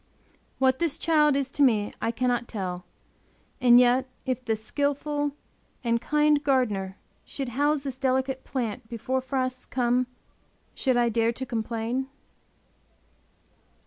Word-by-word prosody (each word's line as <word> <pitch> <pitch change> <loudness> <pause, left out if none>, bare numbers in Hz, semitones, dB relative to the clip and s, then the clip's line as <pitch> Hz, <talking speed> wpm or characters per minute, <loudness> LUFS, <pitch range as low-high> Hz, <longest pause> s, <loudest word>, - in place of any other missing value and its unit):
What 260 0 +2
this 330 -3 +1
child 300 -4 +3
is 275 -1 -1
to 290 - -3
me 220 -6 +3
I - - 0
cannot 245 0 0
tell. 180 -4 -4 0.8
And 245 -1 +7
yet, 250 +1 +3 0.2
if 255 -1 -2
the 225 -2 0
skillful 285 +5 -1 0.5
and 235 -1 +1
kind 300 0 +2
Gardener 210 -9 0 0.3
should 270 -3 -5
house 290 +4 +1
this 270 -2 -5
delicate 265 0 0
plant 235 -3 -4
before 255 +3 -2
frosts 255 -1 -2
come, 245 0 +1 0.7
should 260 -2 +1
I 240 -1 +3
dare 230 0 +2
to 260 +2 -5
complain? 235 +2 -2
255 Hz, 130 wpm, -26 LUFS, 235-275 Hz, 0.8 s, And